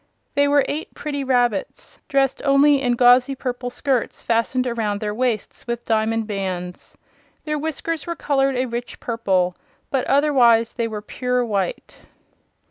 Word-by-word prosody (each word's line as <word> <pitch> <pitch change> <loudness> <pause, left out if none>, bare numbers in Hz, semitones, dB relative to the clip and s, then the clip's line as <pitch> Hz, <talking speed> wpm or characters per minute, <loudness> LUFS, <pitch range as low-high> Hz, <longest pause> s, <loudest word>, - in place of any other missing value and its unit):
They 285 0 +3
were 285 -1 +3
eight 310 +2 -5
pretty 285 -2 -4
rabbits 245 -6 -1
dressed 270 -1 +1
only 280 0 +4
in 245 -2 +1
gauzy 250 +2 +5
purple 245 -1 -4
skirts 255 -1 -2
fastened 235 +2 +1
around 220 -4 -1
their 210 0 -3
waists 240 -1 -2
with 235 0 -4
diamond 225 0 +1
bands. 185 -4 -5 0.5
Their 300 -1 -1
whiskers 320 +1 -3
were 340 - -2
colored 275 -3 +1
a 255 +1 0
rich 240 0 -6
purple, 190 -6 0 0.4
but 265 -2 0
otherwise 245 -6 +4
they 230 -1 -1
were 210 -2 -6
pure 250 +2 -1
white. 200 -5 -3
245 Hz, 145 wpm, -21 LUFS, 225-275 Hz, 0.5 s, gauzy